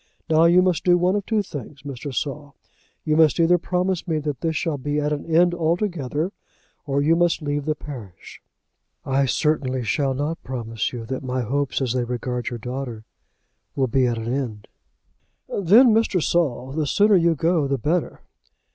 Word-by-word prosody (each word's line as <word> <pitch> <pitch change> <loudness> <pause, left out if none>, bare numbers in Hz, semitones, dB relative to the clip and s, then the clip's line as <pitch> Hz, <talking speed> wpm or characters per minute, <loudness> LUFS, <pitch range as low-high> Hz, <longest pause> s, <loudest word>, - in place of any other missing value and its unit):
Now 160 +1 +5
you 175 +2 +5
must 180 -4 +1
do 175 -1 +4
one 180 +2 +2
of 205 -2 -3
two 220 -2 +1
things, 140 - -9
Mr. 140 0 -6
Saul. 145 +2 -4 0.5
You 155 -1 +1
must 160 0 +4
either 175 +1 +4
promise 180 +1 -1
me 160 -2 0
that 150 -4 -4
this 160 -1 -1
shall 155 -2 -1
be 145 +2 -1
at 150 0 0
an 145 - -5
end 175 +2 +4
altogether, 170 -2 -1 0.6
or 140 0 +1
you 160 +3 +4
must 170 -1 +1
leave 145 -1 -2
the 155 -1 0
parish." 125 - -10 0.6
"I 135 0 +1
certainly 130 0 0
shall 135 +3 0
not 150 +4 -3
promise 115 -3 -3
you 120 -2 -6
that 130 +3 -4
my 130 -1 -2
hopes 140 +4 -1
as 125 -2 -1
they 125 -1 0
regard 125 0 -3
your 120 - -5
daughter 125 -2 -6 0.7
will 135 - +2
be 130 +1 +2
at 120 -1 -1
an 115 +2 -3
end." 115 -7 -4 0.8
"Then, 215 +6 +5
Mr. 220 -4 +2
Saul, 145 -6 0
the 150 +1 -1
sooner 205 +6 +4
you 170 -2 +3
go 160 -1 +1
the 140 0 0
better." 155 +7 -1
145 Hz, 180 wpm, -23 LUFS, 130-170 Hz, 0.8 s, Now